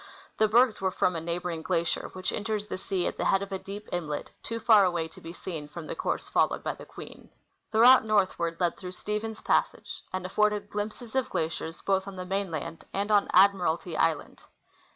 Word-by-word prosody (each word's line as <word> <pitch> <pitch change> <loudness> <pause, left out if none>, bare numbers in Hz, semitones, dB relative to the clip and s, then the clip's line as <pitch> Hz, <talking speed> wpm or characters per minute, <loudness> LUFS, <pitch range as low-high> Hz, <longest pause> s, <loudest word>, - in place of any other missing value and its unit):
The 215 - +5
bergs 235 0 +4
were 190 - +2
from 180 -1 +1
a 165 - -2
neighboring 170 0 -3
glacier, 170 -1 -1
which 185 0 -2
enters 215 -1 -2
the 210 - -5
sea 190 -2 -1
at - - -2
the - - -1
head 195 0 +3
of 200 - -8
a 190 - -2
deep 205 +2 -8
inlet, 155 -4 -3
too 230 0 -4
far 220 -3 +6
away 175 -3 0
to - - -15
be 165 - -8
seen 165 -4 -6
from 155 +2 -8
the - - -4
course - - -2
followed - - +1
by - - 0
i\iQ.Qi - - -10
i.een. - - -15 0.4
The 220 0 +2
route 255 +1 +8
northward 185 -6 +1
led 175 -2 +1
through 180 -1 -7
Stephens 210 +3 -4
passage, - - 0
and 185 -1 -3
afforded 210 +2 +1
glimpses 215 +3 -5
of 260 -1 0
glaciers 160 +1 -3
both 195 0 +1
on 195 - -7
the 185 0 -5
mainland 180 -5 -3
and 200 +2 -1
on 205 -1 +4
Admiralty 180 -3 +3
island. 160 -1 0
190 Hz, 205 wpm, -28 LUFS, 170-210 Hz, 0.4 s, route